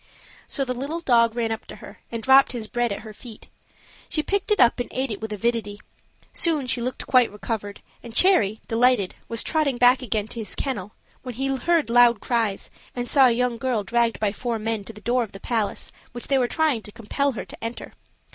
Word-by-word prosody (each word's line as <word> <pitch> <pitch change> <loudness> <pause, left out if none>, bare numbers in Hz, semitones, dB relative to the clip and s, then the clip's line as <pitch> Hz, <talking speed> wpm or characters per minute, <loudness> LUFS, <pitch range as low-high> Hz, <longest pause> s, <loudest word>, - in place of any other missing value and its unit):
So 275 - -2
the 250 - -2
little 280 +7 -4
dog 235 -6 +3
ran 230 -2 -1
up 220 - -5
to - - -9
her - - -13
and 230 -1 -5
dropped 265 0 +6
his 235 -3 -4
bread 240 +1 -1
at 200 - -4
her 215 -1 -10
feet; 225 0 -12 0.6
she 305 -3 0
picked 400 +3 -1
it 420 - +2
up 240 0 +5
and 245 - -3
ate 260 -1 -2
it 210 - -5
with 220 0 -5
avidity. 210 -1 -2 0.5
Soon 315 -5 +3
she 250 -1 -1
looked 255 +2 -4
quite 250 -2 +4
recovered, 205 -1 -5 0.2
and 235 - -10
Cherry, 220 - +4
delighted, 230 -4 +2 0.2
was 230 -1 +1
trotting 300 -5 0
back 250 +2 +5
again 215 -4 -1
to 235 - -6
his 220 - -4
kennel, 210 -8 -4 0.3
when 250 -3 -7
he 270 +2 -1
heard 325 -2 +1
loud 240 -2 +6
cries, 225 -5 -1 0.2
and 245 0 -3
saw 270 -1 +6
a - - +3
young 240 0 0
girl 245 -4 -1
dragged 235 +2 0
by 210 -2 +1
four 235 +2 -3
men 220 -1 -2
to - - -7
the 210 -1 -14
door 245 +3 +1
of 225 -4 -5
the 195 - -9
palace, 220 -1 -2 0.2
which 240 - -6
they 275 -1 +3
were 245 - +2
trying 305 -5 +1
to 210 - -8
compel 255 +5 -2
her 230 - -6
to - - -11
enter. 230 +1 -6
240 Hz, 220 wpm, -24 LUFS, 220-260 Hz, 0.6 s, dropped